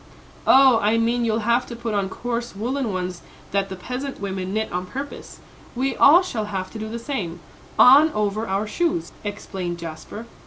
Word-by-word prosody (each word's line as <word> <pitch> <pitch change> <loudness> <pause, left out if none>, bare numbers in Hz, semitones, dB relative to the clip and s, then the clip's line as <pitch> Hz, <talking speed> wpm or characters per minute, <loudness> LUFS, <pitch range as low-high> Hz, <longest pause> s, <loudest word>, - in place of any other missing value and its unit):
"Oh, 265 -3 +7
I 215 +2 +2
mean 235 +1 +1
you'll 225 0 0
have 235 +2 +2
to 235 - -7
put 230 -1 -4
on 200 -2 0
coarse 240 +1 -4
woollen 245 +3 -2
ones 180 -1 -4 0.3
that 195 0 0
the 190 - -5
peasant 250 +8 -5
women 190 -2 -4
knit 220 +2 -2
on 180 +1 -3
purpose, 275 +7 -7 0.4
we 265 +2 -1
all 335 +6 +7
shall 230 -12 -3
have 190 -2 -4
to 220 - -7
do 220 0 -5
the 230 - -4
same, 210 - -4 0.4
on 290 +5 +8
over 210 +1 -1
our 195 +2 -1
shoes," 340 +9 -1
explained 190 -4 -5
Jasper. 170 +7 -8
220 Hz, 185 wpm, -23 LUFS, 195-250 Hz, 0.4 s, on